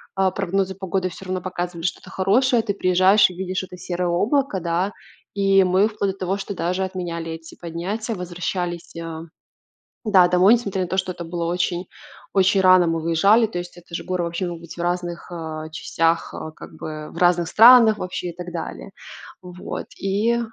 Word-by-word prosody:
а 190 -1 +2
прогнозы 195 0 -1
погоды 190 0 -2
всё 185 +2 -11
равно 185 0 -3
показывали 175 -2 -4
что-то 175 - -3
хорошее. 230 +5 +2
Ты 210 -2 -1
приезжаешь 185 +2 +4
и 180 - -10
видишь 185 0 -3
это 180 -1 -10
серое 180 0 -3
облако, 210 +5 +1
да. 175 +3 -1 0.4
И 195 -1 +4
мы 185 +3 +3
вплоть 210 -3 -2
до - - -18
того, 190 +1 -1
что 200 0 -5
даже 180 +2 -1
отменяли 170 -3 -4
эти 160 0 -9
поднятия, 190 +7 -4
возвращались, 175 -1 -4
а, 165 -1 -6 0.8
да, 195 -5 +6
домой 180 +5 +5
несмотря 200 -5 -1
на 180 - -3
то, 190 - -2
что 185 -1 0
это 170 - -8
было 170 0 -4
очень 175 +1 -1 0.5
очень 195 0 +3
рано 185 -1 +6
мы 165 0 0
выезжали, 195 +8 +4
то 210 -5 -5
есть 175 0 -7
это 175 -1 -12
же - - -3
горы 185 -1 -1
вообще 170 +2 -3
могут 170 -1 -6
быть 170 - -10
в - - -8
разных, 175 0 -3
а, 160 -2 -6
частях, 165 +1 0
а, 155 - -6
как - - -12
бы 155 -1 -7
в - - -9
разных 175 -1 +3
странах 225 +1 +7
вообще 180 -1 -4
и 170 - -13
так 180 0 -7
далее. 60 - -6 0.5
Вот. 180 0 -7
И 210 +5 +1
180 Hz, 190 wpm, -22 LUFS, 170-195 Hz, 0.8 s, странах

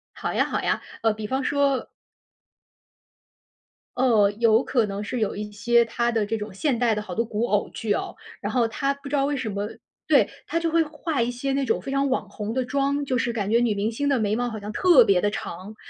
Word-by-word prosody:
好 - - -3
呀， - - +2
好 - - -2
呀， - - 0 0.2
呃， 225 -1 +3
比 215 0 -6
方 265 +4 -1
说 280 -1 +1 2.1
呃， 225 -6 +4
有 230 +1 +4
可 235 -5 +1
能 200 +1 -4
是 240 +3 -3
有 215 - -1
一 210 0 -5
些 235 +3 +3
她 235 +1 0
的 220 -2 +1
这 225 +2 -2
种 210 -2 -6
现 250 +4 0
代 230 -3 +2
的 210 - -2
好 185 -4 -7
多 230 - +1
古 220 +1 -1
偶 205 -1 +1
剧 215 -2 -2
哦， - - -3 0.2
然 - - -3
后 240 -3 +2
她 275 +5 -1
不 280 0 -10
知 290 - -1
道 275 0 +2
为 290 0 0
什 255 -5 -3
么 200 +1 -3 0.4
对， - - +4 0.2
她 335 - 0
就 330 -1 -1
会 335 0 +4
化 300 -2 -3
一 235 - +1
些 250 +3 -3
那 275 -1 0
种 - - 0
非 270 - -6
常 275 0 +1
网 260 - -1
红 210 +1 -5
的 260 0 0
妆。 280 +2 0
就 255 -1 0
是 235 0 0
感 210 -2 -2
觉 235 - +5
女 230 -4 +1
明 210 +3 -1
星 285 +5 -2
的 275 -2 +3
眉 210 0 +1
毛 245 0 -1
好 220 -1 -6
像 205 +1 -6
特 360 - +6
别 190 -2 +3
地 205 - +1
长， 195 +2 -7
235 Hz, 260 characters per minute, -24 LUFS, 210-275 Hz, 2.1 s, 特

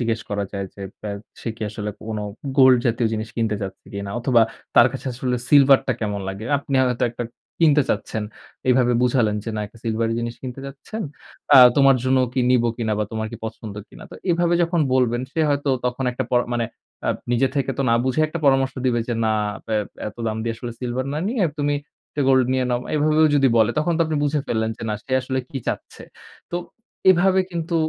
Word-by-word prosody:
জিজ্ঞেস 115 -1 0
করা 100 0 -1
যায় 100 -1 -3
যে 100 - -9 0.2
বা 105 - -4 0.3
সে - - -4
কি - - -7
আসলে 105 0 -4 0.2
কোনো 110 -2 -3 0.3
gold 130 -1 +7
জাতীয় 115 0 +1
জিনিস 110 0 -3
কিনতে 110 -2 0
চাচ্ছে 95 0 -7
কিনা 100 0 -4
অথবা 120 -2 +4 0.3
তার 120 - +8
কাছে 135 - -7
আসলে 125 0 -1
silver 140 -2 +7
টা 130 - +2
কেমন 105 -2 -2
লাগে? 95 +3 -6
আপনি 140 0 -4
হয়তো 125 0 0
একটা 120 0 -5 0.4
কিনতে 150 -3 +5
চাচ্ছেন, 110 - -2 0.5
এভাবে 125 -1 +3
বুঝালেন 120 -4 +2
যে 115 - -3
না - - -1
একটা 115 +3 -17
silvery 115 0 0
জিনিস 120 0 -3
কিনতে 130 +1 -6
চাচ্ছেন 140 +11 -7 0.5
আ - - +10 0.2
তোমার 135 -2 +6
জন্য 130 0 +3
কি 130 - 0
নিব 125 -2 +4
কিনা 110 -3 -1
বা 105 - +1
তোমার 110 0 -2
কি - - -5
পছন্দ 110 -2 -6
কিনা? - - -13
তো - - -10 0.2
এভাবে 175 0 +2
যখন 170 -1 +1
বলবেন 120 -2 +2
সে 165 - -1
হয়তো 145 0 0 0.2
তখন 125 +2 -2
একটা 130 +1 -2
পর 125 - +4
মানে 120 -1 0 0.4
আ - - +1 0.2
নিজে 130 +2 +3
থেকে 135 -1 0
তো 135 - +2
না 115 - +5
বুঝে 130 +4 +1
একটা 155 +2 -5
পরামর্শ 135 -1 +3
দিবে 120 -2 +2
যে 120 - 0
না 110 - +2 0.3
আব - - -17 0.4
এত 105 - -13
দাম 110 0 -1
দিয়ে 115 0 -2
আসলে 120 0 -6
silver 125 +1 -2
না 150 - -2
নিয়ে 225 -5 +1 0.2
তুমি 145 0 +1 0.4
একটা 145 - -2
gold 130 -1 +5
নিয়ে 130 -1 +1
নাও, 120 0 +1
এভাবেও 155 +1 +4
যদি 135 -1 +4
বলে 110 +1 +4
তখন 160 +3 +1
তো - - -2
আপনি 155 - -1
বুঝে 145 +1 +1
ফেললেন 110 -1 0
যে - - -10
না 105 - 0
সে 130 - -7
আসলে 130 +1 -2
কি 135 - -4
চাচ্ছে? - - -5 0.5
তো 175 - -1 0.5
এভাবে 185 +1 +4
কিন্তু 170 0 -3
125 Hz, 215 wpm, -22 LUFS, 115-140 Hz, 0.5 s, আ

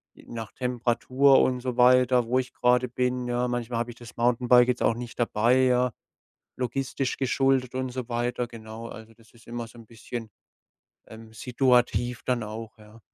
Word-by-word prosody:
J - - -18
nach 115 -3 -6
Temperatur 125 +2 +2
und 125 -1 0
so 125 -1 -4
weiter, 125 0 +5
wo 125 +3 +1
ich 130 - -5
grade 125 +1 +2
bin, 125 0 -1
ja? 120 0 0
Manchmal 120 -1 -3
hab 120 +1 -2
ich 120 - -9
das 120 -3 -13
Mountainbike 125 +1 +4
jetzt 125 - 0
auch 115 - +2
nicht 120 0 -8
dabei, 120 +2 +3
ja? 125 0 +2 0.7
Logistisch 130 +1 -2
geschuldet 135 -1 +1
und 130 0 -2
so 125 -1 -6
weiter, 120 +1 -2
genau. 115 -1 -9
Also 110 0 -11
das 115 +1 -23
ist 115 0 -20
immer 120 0 -5
so 115 - -17
'n 115 - -12
bisschen, 115 0 -8 0.8
ähm, 110 0 -13
situativ 120 -1 +1
dann 125 -2 0
auch, 110 +2 -8
ja. 105 +1 -17
120 Hz, 180 wpm, -26 LUFS, 115-125 Hz, 0.8 s, weiter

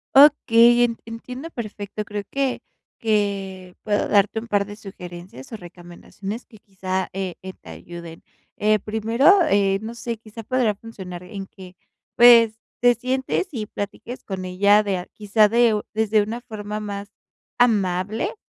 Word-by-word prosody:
Okey, 240 -4 +7
en 230 -1 0
entiendo 250 +6 -8
perfecto. 210 -3 -6
Creo 205 0 -5
que 275 -2 -1 0.4
que 195 -4 -1
puedo 205 -1 0
darte 205 +2 +3
un 225 - -9
par 205 -2 +1
de 205 - -8
sugerencias 180 -8 -10
o 225 - -5
recomendaciones, 175 +4 -9
que 220 - -18
quizá, 190 -2 -4
eh 190 -1 -3
eh, 190 0 -8
te - - -15
ayuden. 165 - -10 0.4
Eh, 215 +1 +3
primero, 225 - +3
eh, 195 -1 +2
no 225 +2 -7
sé, 235 0 -4
quizá 220 +1 -11
podría 240 -2 +1
funcionar, 190 -5 -9
en 195 +1 -8
que, 185 -2 -13 0.4
pues, 230 -2 +7 0.2
te 245 0 +6
sientes 260 +8 -1
y 220 -5 -3
platiques 205 +5 -7
con 190 -2 -5
ella 200 +3 +4
de 200 -2 -1
a 180 - -6
quizá 210 0 +3
de 235 0 +4
u 210 - -1
desde 220 -1 +3
una 225 +4 -4
forma 210 -2 -6
más 200 -1 -6 0.5
amable 205 -3 +1
210 Hz, 155 wpm, -22 LUFS, 195-230 Hz, 0.5 s, Okey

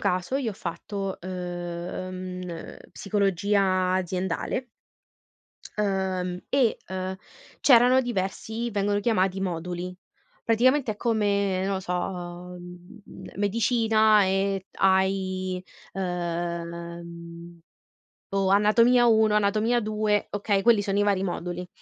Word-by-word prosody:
caso, 180 +7 -1
io 270 -5 0
ho - - -6
fatto, 195 +2 -5
uhm 180 0 -5
uh, 165 -1 -9
psicologia 195 -1 +1
aziendale 185 +6 -2 1.1
ehm, 190 -3 -1
e, 260 -5 +2
uhm, 185 0 -4 0.4
c'erano 250 0 +6
diversi 225 0 -3
vengono 205 -1 0
chiamati 195 -4 +1
moduli, 180 0 -4 0.5
praticamente, 245 +2 +3
è 210 - -14
come, 200 -4 +1
non 195 0 0
lo 190 - -2
so, 180 - -4
uhm, 180 +1 -6
m - - -11
medicina 220 0 +3
e, 195 0 0
hai, 190 -1 +1 0.3
ehm 170 -1 -5 0.7
o 195 -1 +1
anatomia 230 +5 +5
1, 220 -2 +4
anatomia 215 +3 +2
2, 215 -1 0
okay, 205 -1 0
quelli 220 -2 +4
sono 200 0 0
i - - +4
vari 200 -2 +1
moduli. 180 0 -4
190 Hz, 105 wpm, -26 LUFS, 180-210 Hz, 1.1 s, c'erano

